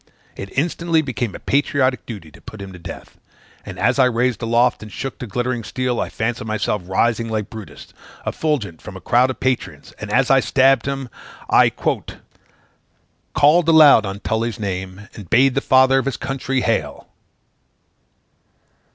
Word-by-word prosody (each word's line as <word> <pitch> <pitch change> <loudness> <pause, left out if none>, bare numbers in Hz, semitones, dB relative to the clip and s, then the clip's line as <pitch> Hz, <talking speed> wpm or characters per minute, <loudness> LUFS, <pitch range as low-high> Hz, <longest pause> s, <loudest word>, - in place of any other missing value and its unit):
It 100 - -7
instantly 165 +1 +1
became 120 -6 -3
a - - -8
patriotic 135 -2 0
duty 95 -10 -8
to - - -17
put 110 - -11
him 100 -1 -8
to 90 - -11
death; 85 - -10 0.4
and - - -9
as 125 +5 +1
I 130 - +6
raised 125 0 0
aloft 120 +2 +2
and 110 -1 -10
shook 135 +5 -6
the 125 - -6
glittering 120 +2 -2
steel, 125 +1 -2
I - - -2
fancied 115 0 -3
myself 105 -1 -1
rising 115 +4 0
like 110 -2 -3
Brutus, 110 -3 -11 0.3
effulgent 120 - -2
from - - -9
a - - -10
crowd 125 +3 +2
of 130 - -5
patriots, 130 -1 -3
and, - - -6
as - - +2
I - - +6
stabbed 135 -1 +3
him, 135 -1 -3 0.4
I - - +6
"called - - -3 1.5
aloud 150 -9 +7
on 95 +1 -6
Tully's 110 0 -2
name, 95 0 -5
And 100 -6 -11
bade 130 +3 +4
the 135 - 0
father 130 0 +4
of 130 - -3
his 135 -3 -2
country 135 -1 -2
hail!" - - -2
120 Hz, 165 wpm, -20 LUFS, 110-135 Hz, 1.5 s, aloud